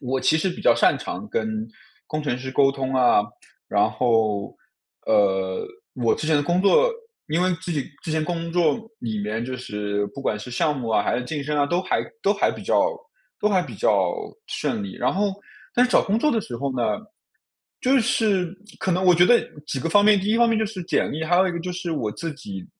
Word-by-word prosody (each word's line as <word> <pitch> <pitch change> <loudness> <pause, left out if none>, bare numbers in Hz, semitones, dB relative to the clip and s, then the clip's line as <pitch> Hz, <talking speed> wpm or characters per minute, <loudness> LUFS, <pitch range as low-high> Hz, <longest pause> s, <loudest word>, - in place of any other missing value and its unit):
我 130 -1 -2
其 155 - +3
实 185 +4 0
比 - - -7
较 - - +5
擅 - - +3
长 - - -6
跟 220 - -2 0.4
工 155 0 -3
程 140 -4 -1
师 130 +1 -6
沟 135 +1 +4
通 135 -1 -3
啊， 125 -5 +5 0.5
然 - - +3
后， 110 -4 0 0.5
呃， 95 -3 +2 0.3
我 120 -3 +1
之 155 - -4
前 160 - +3
的 145 - +3
工 175 +4 +1
作， 470 - +5 0.4
因 160 +3 +1
为 185 +1 +2
自 - - -6
己 145 -5 -1 0.2
之 165 - -5
前 155 0 0
工 170 0 -3
作 170 -3 +3 0.2
里 110 - -3
面 110 +3 -2
就 130 +1 -4
是 105 -3 -3
不 105 - -10
管 110 - -1
是 105 +4 -9
项 150 +4 0
目 125 -4 -4
啊， 110 - +3
还 - - 0
是 125 - -3
晋 145 +2 -4
升 150 +1 -2
啊， 145 - +3
都 175 +5 0
还 - - 0 0.2
都 - - +3
还 - - +2
比 - - -8
较 - - +3 0.5
都 210 - +2
还 190 -3 +2
比 - - -9
较 - - +2 0.4
顺 220 -3 -2
利。 200 - -7
然 - - 0
后， 200 +1 +1 0.4
但 245 - +4
是 - - -9
找 - - +5
工 205 +3 0
作 300 - +2
的 230 - +1
时 120 - -7
候 135 0 -3
呢， 110 -4 0 0.8
就 260 +2 +3
是 205 -6 +1 0.3
可 190 - 0
能 185 +1 +1
我 180 -1 +6
觉 175 +1 +6
得 240 +5 +5 0.2
几 145 - -3
个 150 - -2
方 205 +5 +5
面， 210 -1 +6
第 195 - -3
一 215 +2 +2
方 235 0 +4
面 225 -1 +2
就 220 - +1
是 200 -3 -6
简 - - 0
历， 155 - -4
还 170 +2 +2
有 190 +1 +5
一 180 - -1
个 170 - -4
就 180 +2 -4
是 175 -1 -4
我 115 -9 -2
自 165 +7 -5
己， 100 -10 -8
155 Hz, 255 characters per minute, -23 LUFS, 125-190 Hz, 0.8 s, 我